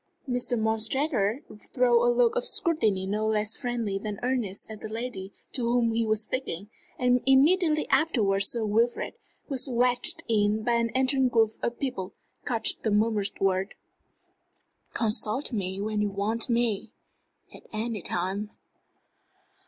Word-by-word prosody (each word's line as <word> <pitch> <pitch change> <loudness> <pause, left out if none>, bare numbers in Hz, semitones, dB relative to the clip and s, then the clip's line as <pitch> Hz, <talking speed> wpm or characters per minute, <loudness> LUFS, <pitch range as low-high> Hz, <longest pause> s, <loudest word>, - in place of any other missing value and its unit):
Mr. 245 -1 -1
Montresor 220 +2 0 0.3
threw 240 -2 +4
a 240 - +4
look 240 -1 +3
of - - 0
scrutiny 220 - +1
no 210 +3 -1
less 215 0 0
friendly 230 -5 -2
than 210 -1 -5
earnest 245 -6 -1
at 220 -1 -9
the 220 - -6
lady 220 -4 -5 0.2
to 255 - -2
whom 235 0 +2
he 230 +1 +1
was 215 0 +2
speaking; 210 -6 -5 0.3
and 250 0 +2
immediately 305 +4 +4
afterwards 200 -11 +3
Sir 230 -2 -1
Wilfrid, 230 +3 0 0.3
who - - -33
was 270 0 -1
wedged 245 0 +1
in 215 -1 +1
by 240 +1 +1
an 235 0 +1
entering 265 0 +3
group 225 -2 +3
of 235 - -2
people, 210 -9 -4 0.3
caught 230 -3 +1
the 220 - 0
murmured 210 -1 +2
words: 195 +1 0 1.2
"Consult 225 +4 0
me 190 -3 -2
when 210 +1 -1
you 210 - +1
want 210 +4 -1
me 230 -2 0 0.6
at - - -11
any 220 -1 -3
time." 190 +5 -1
225 Hz, 145 wpm, -27 LUFS, 210-245 Hz, 1.2 s, threw